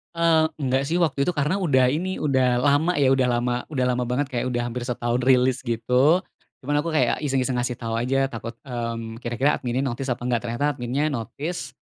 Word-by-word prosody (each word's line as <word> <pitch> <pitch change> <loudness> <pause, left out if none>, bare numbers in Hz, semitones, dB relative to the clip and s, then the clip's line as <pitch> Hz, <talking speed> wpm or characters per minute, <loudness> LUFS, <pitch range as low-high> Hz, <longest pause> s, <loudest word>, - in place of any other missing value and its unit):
Eee, 165 -1 +3
enggak 130 -2 0
sih 170 - +1
waktu 155 -6 +1
itu 140 - +2
karena 150 +8 0
udah 130 -8 +4
ini, 185 +5 -2
udah 130 -4 +2
lama 145 +5 +3
ya, 135 -2 +4
udah 130 -1 +2
lama 120 0 0 0.2
udah 130 -5 0
lama 125 0 -1
banget, 130 +4 0
kayak 130 -1 -2
udah 120 -1 -1
hampir 120 +1 -4
setahun 120 0 -1
rilis 130 0 +3
gitu, 130 +8 +2 0.4
cuman 145 +1 +1
aku 165 - -3
kayak 130 -7 +1
iseng-iseng 135 -3 0
ngasih 120 -1 -3
tau 115 -1 -4
aja, 130 +4 +1
takut, 115 -2 -7
mmm, 115 -2 -5
kira-kira 120 +5 +1
adminnya 125 +2 -1
notice 130 +1 -3
apa 120 0 -2
enggak. 120 -2 0
Ternyata 125 +5 -1
adminnya 135 +4 -1
notice, 150 +9 -5
130 Hz, 195 wpm, -24 LUFS, 120-145 Hz, 0.4 s, udah